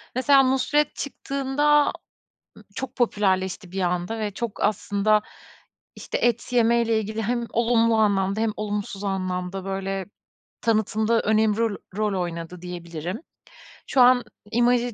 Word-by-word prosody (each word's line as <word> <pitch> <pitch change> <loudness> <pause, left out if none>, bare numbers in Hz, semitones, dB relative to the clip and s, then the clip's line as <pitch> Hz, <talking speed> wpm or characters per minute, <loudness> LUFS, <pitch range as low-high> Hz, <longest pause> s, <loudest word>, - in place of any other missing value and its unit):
mesela 270 +1 +5
Nusret 275 +3 +1
çıktığında 285 +1 +1 0.7
ı - - -15
çok 265 0 -5
popülerleşti 190 -5 0
bir 190 0 -3
anda 180 +5 -1
ve 210 -1 -2
çok 235 +1 -5
aslında, 210 0 +2 0.7
işte, - - -4
et 240 +1 0
yemeyle 230 -1 +3
ilgili 215 +1 -4
hem 235 +2 -1
olumlu 230 -1 +3
anlamda 200 -1 +2
hem 225 -1 +1
olumsuz 205 -1 -4
anlamda, 185 -1 -3
böyle, 195 -1 -3 0.6
tanıtım 220 -1 +1
da 230 -1 +3
önem 215 0 +2
ro 225 -3 0 0.2
rol 210 -3 0
oynadı, 170 +1 -6
diyebilirim. 175 - -6 0.7
Şu 265 - +3
an 245 0 +6 0.3
imajı 240 0 +2
215 Hz, 130 wpm, -24 LUFS, 195-240 Hz, 0.7 s, an